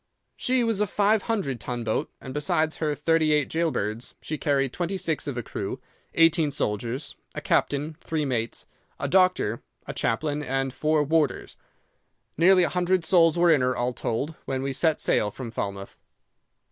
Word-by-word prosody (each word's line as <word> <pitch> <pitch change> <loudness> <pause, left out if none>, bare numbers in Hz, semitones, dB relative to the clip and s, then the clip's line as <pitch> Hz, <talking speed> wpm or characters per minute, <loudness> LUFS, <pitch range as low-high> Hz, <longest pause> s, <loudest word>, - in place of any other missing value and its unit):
She 255 -1 +1
was 225 -3 +1
a 210 - +2
five 205 +2 +2
hundred 145 - -1
ton 120 +3 -4
boat, 110 -1 -1
and 130 - -8
besides 155 +2 0
her 150 -2 -1
thirty 160 +1 +2
eight 150 -2 +1
gaol 165 0 +2
birds, 110 -3 -3
she 155 - -4
carried 140 -3 0
twenty 180 +2 -2
six 165 -5 -2
of 135 -3 -3
a 120 - -2
crew, 100 +5 -5 0.4
eighteen 165 -2 +4
soldiers, 120 0 -3 0.2
a - - -2
captain, 150 +2 0
three 155 -2 -2
mates, 120 -4 -2 0.3
a - - -1
doctor, 180 - +2 0.2
a - - -5
chaplain, 145 +6 -1
and 135 -2 -1
four 155 +1 +2
warders. 150 -1 0 0.8
Nearly 180 +3 +5
a - - +2
hundred 180 -1 +1
souls 165 -2 +4
were 170 0 +5
in 145 - +2
her, 125 0 +1
all 120 +1 0
told, 125 +6 -2
when 130 0 -2
we 135 0 -2
set 160 +2 +1
sail 105 - +1
from 120 +2 -7
Falmouth. 100 -3 -5
150 Hz, 175 wpm, -26 LUFS, 125-165 Hz, 0.8 s, Nearly